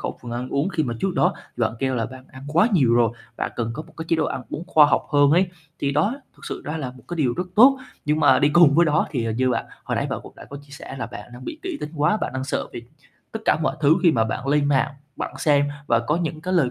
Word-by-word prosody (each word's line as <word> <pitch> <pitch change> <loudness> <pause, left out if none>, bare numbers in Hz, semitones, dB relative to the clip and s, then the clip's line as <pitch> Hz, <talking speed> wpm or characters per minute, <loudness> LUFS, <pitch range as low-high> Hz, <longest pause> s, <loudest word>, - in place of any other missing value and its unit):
khẩu - - -5
phần 120 - -7
ăn 125 +2 -4
uống, 140 +6 0
khi 165 -4 -1
mà 120 -4 -2
trước 195 -2 -1
đó 180 - +2 0.2
bạn 115 -2 0
kêu 130 -1 0
là 115 -3 -1
bạn 130 0 -11
ăn 130 +1 -12
quá 175 +9 +4
nhiều 130 -11 +4
rồi, 120 -2 +4 0.3
bạn - - -3
cần 115 -1 -2
có 155 - -5
một - - -18
cái 160 - -5
chế 165 - +3
độ 155 - +1
ăn - - -3
uống 165 - -5
khoa 155 -5 +6
học - - +2
hơn 145 -1 +5
ấy, 175 +4 +4 0.3
thì 140 0 -1
đó 160 - +1 0.2
thực - - -15
sự - - -5
đó 150 +2 -3
là 130 -5 -4
một 125 -1 -17
cái 175 - -4
điều 130 -7 +1
rất 180 0 -3
tốt. 265 +4 +7 0.3
Nhưng 150 +1 +1
mà 130 -1 +6
đi 145 - +4
cùng 150 -2 +6
với 170 +2 +5
đó 150 0 +2
thì, 125 -6 -2
à, - - -1
như 130 +3 +1
bạn - - -1 0.2
hồi - - -2
nãy - - 0
bạn - - -3
cũng - - -12
đã - - -11
có 140 - -7
chia 145 - -21
sẻ 140 -1 -9
là 115 - -3
bạn 115 -1 -10
đang 125 +1 -10
bị 310 - -6
kỹ 365 -5 -4
tính 150 - -5
quá, 150 +8 +2
bạn 215 - -3
đang 130 0 -3
sợ 135 - -2
vì 120 - -7 0.5
tất 220 - -4
cả - - +4
mọi 150 - 0
thứ 155 +2 +5
khi 170 -3 +5
mà 110 -3 +2
bạn 125 +4 -4
lên 145 0 +3
mạng, 140 0 +1 0.2
bạn - - -5
xem 145 -2 +3 0.2
và 115 -4 +3
có 150 +7 0
những 160 -2 -3
cái 185 +2 -2
lời 135 -8 +3
145 Hz, 305 wpm, -23 LUFS, 130-160 Hz, 0.5 s, tốt